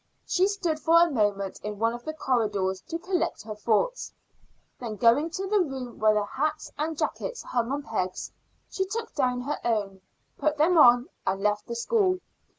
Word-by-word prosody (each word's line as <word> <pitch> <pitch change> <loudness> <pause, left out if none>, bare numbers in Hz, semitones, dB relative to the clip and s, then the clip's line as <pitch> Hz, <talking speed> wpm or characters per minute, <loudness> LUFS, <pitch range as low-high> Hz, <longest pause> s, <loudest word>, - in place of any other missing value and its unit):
She 375 +1 +2
stood 355 -6 -1
for 330 +1 +5
a 340 -1 +4
moment 205 -5 0
in 210 0 -4
one 230 +2 +1
of 240 0 -8
the 310 - -3
corridors 205 -9 0
to 330 - -3
collect 360 +1 -2
her 215 0 -6
thoughts; 220 - 0 0.7
then 230 -4 -5
going 235 - +4
to 380 +4 -4
the 415 +2 +2
room 265 -8 -3
where 215 0 +4
the 210 -1 +1
hats 300 +6 -2
and 315 +1 -2
jackets - - -3
hung 240 0 -1
on 285 +1 -2
pegs, 185 -7 -3 0.4
she 380 - -2
took 455 +4 -5
down 250 -3 0
her 285 +4 -3
own, 200 -5 -1 0.4
put 305 -1 +1
them 325 +4 +4
on, 245 -5 +7 0.2
and 195 +1 0
left 210 0 0
the 235 - -4
school. 370 - +2
255 Hz, 185 wpm, -27 LUFS, 215-330 Hz, 0.7 s, on